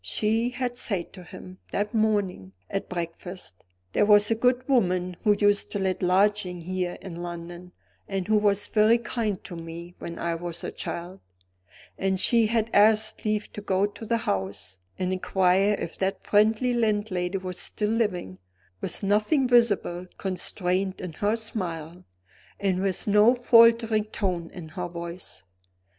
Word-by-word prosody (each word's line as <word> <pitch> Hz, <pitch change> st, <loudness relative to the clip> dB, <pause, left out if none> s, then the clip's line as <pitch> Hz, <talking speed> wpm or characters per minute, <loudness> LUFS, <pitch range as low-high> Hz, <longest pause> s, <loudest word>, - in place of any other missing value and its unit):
She 225 Hz, +3 st, 0 dB
had 245 Hz, -1 st, -3 dB
said 195 Hz, -8 st, -2 dB
to 185 Hz, -, -11 dB
him, 185 Hz, +1 st, -11 dB
that 210 Hz, +2 st, -2 dB
morning, 205 Hz, -, 0 dB, 0.2 s
at 195 Hz, -, -3 dB
breakfast: 175 Hz, -, -6 dB, 0.3 s
"There -, -, +3 dB
was 205 Hz, +1 st, +5 dB
a -, -, +6 dB
good 250 Hz, +2 st, +1 dB
woman 185 Hz, -8 st, +1 dB
who 210 Hz, -2 st, +4 dB
used 205 Hz, -1 st, +2 dB
to -, -, -1 dB
let 190 Hz, -1 st, -1 dB
lodgings 185 Hz, -1 st, +1 dB
here 180 Hz, 0 st, -3 dB
in 175 Hz, -3 st, -7 dB
London, 175 Hz, +1 st, -7 dB, 0.4 s
and 195 Hz, -2 st, -3 dB
who 215 Hz, 0 st, +4 dB
was 205 Hz, -1 st, +2 dB
very 220 Hz, +2 st, +4 dB
kind 220 Hz, -4 st, -3 dB
to 180 Hz, -, -8 dB
me 165 Hz, +1 st, -8 dB
when 170 Hz, 0 st, -7 dB
I 170 Hz, 0 st, -1 dB
was 170 Hz, 0 st, -5 dB
a -, -, -4 dB
child;" 180 Hz, +3 st, -6 dB, 0.8 s
and 190 Hz, -1 st, 0 dB
she 230 Hz, +2 st, +4 dB
had 225 Hz, 0 st, 0 dB
asked 215 Hz, +1 st, +3 dB
leave 210 Hz, -1 st, -1 dB
to 210 Hz, -, -6 dB
go 195 Hz, -1 st, +1 dB
to 205 Hz, +2 st, -8 dB
the 230 Hz, +1 st, 0 dB
house, 95 Hz, -, -4 dB, 0.2 s
and 185 Hz, 0 st, -1 dB
inquire 190 Hz, +2 st, +2 dB
if 170 Hz, -, -6 dB
that 195 Hz, 0 st, -1 dB
friendly 220 Hz, +4 st, +3 dB
landlady 205 Hz, -5 st, 0 dB
was 185 Hz, -1 st, -6 dB
still 210 Hz, 0 st, -2 dB
living 185 Hz, -, -1 dB, 0.4 s
with -, -, -2 dB
nothing 215 Hz, +8 st, +2 dB
visibly 205 Hz, -7 st, +2 dB
constrained 185 Hz, 0 st, -1 dB
in 180 Hz, -3 st, -6 dB
her 205 Hz, +7 st, 0 dB
smile, 180 Hz, -7 st, -5 dB, 0.5 s
and 190 Hz, -2 st, 0 dB
with 195 Hz, 0 st, -1 dB
no 210 Hz, +4 st, +5 dB
faltering 230 Hz, -2 st, +5 dB
tone 180 Hz, -6 st, -3 dB
in 170 Hz, -3 st, -9 dB
her 180 Hz, +2 st, -4 dB
voice. 170 Hz, -, -7 dB
195 Hz, 155 wpm, -26 LUFS, 180-215 Hz, 0.8 s, a